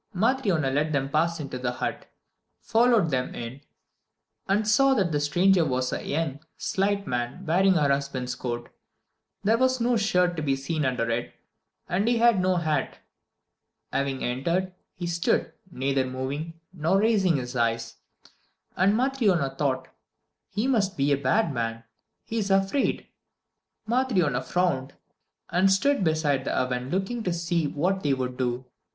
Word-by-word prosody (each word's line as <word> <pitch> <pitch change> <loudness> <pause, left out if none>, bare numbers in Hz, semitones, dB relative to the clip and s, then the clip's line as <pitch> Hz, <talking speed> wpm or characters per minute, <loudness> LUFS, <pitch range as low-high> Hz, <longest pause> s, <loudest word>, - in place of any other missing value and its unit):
Matryona 195 - +1
let 150 +2 0
them 135 -1 0
pass 165 +2 +1
into 135 -4 -5
the 125 -1 -2
hut, - - -4 0.5
followed 225 -6 +3
them 130 -1 -1
in, 120 +4 -7 0.9
and 205 +2 +1
saw 270 +5 +4
that 190 -7 +1
the 145 - +1
stranger 175 +5 +3
was 130 -3 -1
a - - -3
young, 145 -2 -2 0.2
slight 200 +1 0
man, 125 +8 -3
wearing 190 +4 +4
her 150 -4 +3
husband's 140 -2 -1
coat. 120 -2 -5 0.7
There 220 +3 +3
was 260 0 +2
no 240 0 +2
shirt 180 -4 +2
to - - -1
be 140 -2 +1
seen 145 +3 -2
under 125 -3 0
it, 115 +1 -3 0.5
and 195 +5 0
he 240 0 +3
had 230 -4 +4
no 185 0 +2
hat. 155 -5 -1 1.0
Having 135 -1 -1
entered, 170 +10 -1 0.2
he 175 - -5
stood, 170 -1 0 0.2
neither 135 -4 0
moving, 140 +6 -5
nor 170 +3 +1
raising 200 -7 +3
his 125 -1 -5
eyes, 115 -1 -1 0.8
and 195 +4 +3
Matryona 220 - +1
thought: 135 -2 -1 0.6
"He 210 +5 -2
must 215 -7 +1
be 140 +1 +2
a - - +5
bad 140 +6 +1
man 115 -1 -3 0.4
he's 220 -3 -2
afraid." 195 +7 +1 0.8
Matryona 205 - +1
frowned, 135 -2 -1 0.6
and 190 +2 +4
stood 275 +4 +2
beside 155 -5 +1
the - - -2
oven 125 0 -1
looking 195 +8 -2
to 185 - -1
see 170 -2 0
what 185 +7 -1
they 140 -5 +1
would 125 -1 -3
do. 125 0 -2
165 Hz, 150 wpm, -26 LUFS, 135-195 Hz, 1.0 s, a